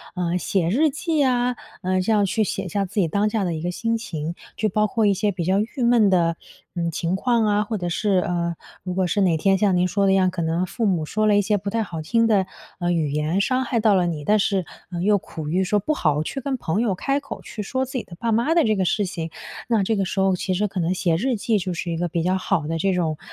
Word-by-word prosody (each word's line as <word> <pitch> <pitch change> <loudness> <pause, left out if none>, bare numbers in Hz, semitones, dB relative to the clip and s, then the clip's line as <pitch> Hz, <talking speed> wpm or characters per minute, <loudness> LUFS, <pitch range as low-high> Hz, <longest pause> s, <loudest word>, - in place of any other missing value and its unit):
呃， 180 -1 0
写 180 -2 0
日 295 - +3
记 310 +2 -1
啊， 250 -2 +1 0.2
呃， 185 0 0
这 190 +4 +1
样 205 -1 +3
去 215 +3 +1
写 195 -1 -3
下 200 +3 0
自 200 +2 -1
己 170 - +1
当 205 +5 +1
下 210 -1 -1
的 175 -2 -1
一 160 - -4
个 175 +2 -2
心 230 +5 -1
情。 165 -7 -5 0.2
就 215 - 0
包 210 +2 +2
括 225 -1 +1
一 200 - +4
些 205 +2 0
比 175 -2 -3
较 190 +4 +2
郁 235 +5 -2
闷 235 -3 +5
的， 170 -3 +2 0.4
嗯， 170 -1 -1
情 170 +3 -1
况 235 +2 +2
啊， 210 0 +2
或 215 +1 -3
者 175 -2 -3
是 195 +2 +1
呃， 170 -1 -1 0.3
如 180 0 -4
果 185 0 +1
是 200 +4 0
哪 175 -4 +3
天 195 +4 +3
像 195 -2 +2
您 180 0 +2
说 200 +2 +1
的 195 - +4
一 - - +4
样， 185 -1 +3
可 180 -1 -4
能 165 +2 0
父 225 +5 -3
母 175 -6 +1
说 215 +7 0
了 205 -1 +4
一 - - +4
些 210 +1 +1
不 200 +1 -4
太 225 +2 0
好 165 -6 -6
听 230 +8 +2
的， 200 -4 +3 0.3
呃， 175 -1 0
语 160 -4 0
言， 150 +5 0
伤 255 +5 +1
害 240 -2 0
到 215 -1 +4
了 180 -2 +3
你， 155 -3 -3
但 210 +8 +3
是， 195 -3 +1 0.3
嗯， 175 0 -3
又 205 +1 +4
苦 160 -5 -7
于 185 +4 +1
说 205 +3 +1
不 305 +10 -1
好 150 - +1
去 270 - -5
跟 270 0 -2
朋 195 -1 -1
友 215 -6 +1
开 275 +9 0
口 280 - -8
去 215 - -7
说 260 +6 -1
自 260 - -11
己 240 - -3
的 170 - -12
爸 230 +4 -1
妈 235 +8 +2
的 335 - +5
这 215 -1 +2
个 190 -2 0
事 205 +3 +1
情， 165 -3 -4 0.4
那 225 -4 +2
这 220 +3 +1
个 195 -2 0
时 190 - -3
候 190 -1 +3
其 185 +1 -2
实 205 +3 +1
可 190 -1 -5
能 170 +1 +1
写 175 -3 +1
日 245 +9 0
记 220 +1 +1
就 185 -1 -3
是 170 0 -4
一 165 - -2
个 175 +1 -1
比 165 0 -2
较 185 +2 +1
好 165 -4 -1
的 165 +1 -1
这 190 +4 +1
种， 165 -4 -1
195 Hz, 305 characters per minute, -23 LUFS, 175-215 Hz, 0.4 s, 闷